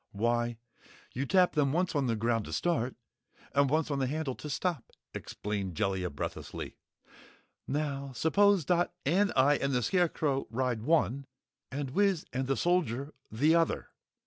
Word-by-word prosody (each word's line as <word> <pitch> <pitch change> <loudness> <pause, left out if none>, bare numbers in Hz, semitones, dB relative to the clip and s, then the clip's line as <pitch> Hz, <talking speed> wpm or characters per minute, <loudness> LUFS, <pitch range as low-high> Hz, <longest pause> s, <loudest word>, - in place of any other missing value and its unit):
"Why, 120 +2 0 0.6
you 135 +3 -2
tap 185 -2 +4
them 145 -2 +2
once 180 +2 +1
on 140 -4 +1
the 115 - +1
ground 115 0 0
to - - -7
start, 140 -8 0 0.6
and 140 0 +3
once 155 +1 +1
on 140 - 0
the 130 - +1
handle 150 -1 -2
to 150 - -8
stop," 150 -2 -1 0.3
explained 100 -4 -4
Jellia 95 +1 0
breathlessly! 70 - -6 0.9
"Now, 140 -1 -2
suppose 195 - +3
Dot 175 +2 +2
and 195 +8 +3
I 140 +2 +5
and 140 0 -1
the 125 -1 +1
Scarecrow 155 - +1
ride 120 -1 -1
one, 140 -1 +1 0.4
and 135 -1 -3
Wiz 195 0 +2
and 130 +1 -1
the 135 - +1
Soldier, 150 -6 0 0.2
the 145 +9 +3
other. 165 -1 +1
140 Hz, 155 wpm, -30 LUFS, 120-160 Hz, 0.9 s, I